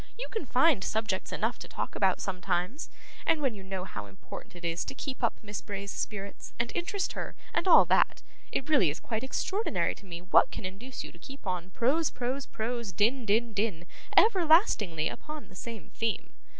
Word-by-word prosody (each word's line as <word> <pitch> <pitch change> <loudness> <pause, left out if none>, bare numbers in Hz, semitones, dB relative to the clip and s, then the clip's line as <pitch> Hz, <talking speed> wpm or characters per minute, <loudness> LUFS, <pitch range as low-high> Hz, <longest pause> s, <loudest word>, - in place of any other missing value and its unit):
You - - -4
can 440 - -3
find 260 -5 +4
subjects 215 -3 -1
enough - - -1
to - - -7
talk - - -4
about - - +3
sometimes, 185 - -1 0.3
and 325 - +3
when 270 -5 +1
you 200 - -9
know 190 -1 -4
how 105 - -6
important 100 - -10
it 175 0 -8
is 170 +1 0
to - - -5
keep 265 -2 -5
up 235 - +2
Miss 205 -1 -5
Bray's 200 -1 -5
spirits, 200 -1 -5
and 235 0 0
interest 375 +3 -1
her, - - -5 0.2
and - - +1
all - - +9
that, - - +3 0.3
it 270 - -1
really 285 - +5
is 145 - -4
quite 225 0 -3
extraordinary 385 +10 0
to 200 - -15
me 170 -2 -5
what 185 - +5
can - - -6
induce 220 +8 -6
you - - -8
to - - -17
keep 275 -2 -11
on 180 -1 -2
prose, 275 - +2
prose, 255 +3 -3
prose, 235 -1 -3
din, 230 +7 +2
din, 225 +3 +2
din, 200 -5 -1 0.3
everlastingly, 320 - +5
upon 305 0 -7
the 185 - -15
same 230 +3 -7
theme. 225 -1 -2
220 Hz, 195 wpm, -30 LUFS, 190-270 Hz, 0.3 s, all